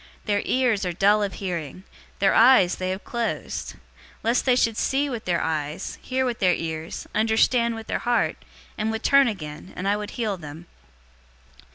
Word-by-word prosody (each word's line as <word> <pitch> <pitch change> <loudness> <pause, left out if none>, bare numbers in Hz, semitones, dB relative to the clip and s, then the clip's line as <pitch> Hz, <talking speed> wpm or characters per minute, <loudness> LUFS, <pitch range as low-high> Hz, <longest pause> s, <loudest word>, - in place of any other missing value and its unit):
Their 205 -1 +1
ears 245 -6 +1
are 180 -2 -2
dull 205 +4 +3
of 200 -2 -1
hearing. 180 -2 -5 0.3
Their 195 - +3
eyes 230 -7 +6
they 185 0 -2
have 190 +2 -4
closed. 235 -1 -4 0.5
Lest 235 +2 +1
they 250 - +5
should 230 -3 +2
see 275 +5 0
with 235 -3 -5
their 175 -2 0
eyes, 155 -1 -3
hear 260 0 -1
with 240 -2 -2
their 180 -2 +3
ears, 160 0 -5
understand 225 +2 +2
with 225 0 -8
their - - -2
heart, 240 0 0 0.4
and 215 +1 0
would 220 0 -3
turn 275 -1 +5
again, 155 -6 -6
and 185 - -3
I 200 - +3
would 210 0 -5
heal 215 -5 -1
them.' 160 +1 -10
210 Hz, 180 wpm, -24 LUFS, 180-235 Hz, 0.5 s, eyes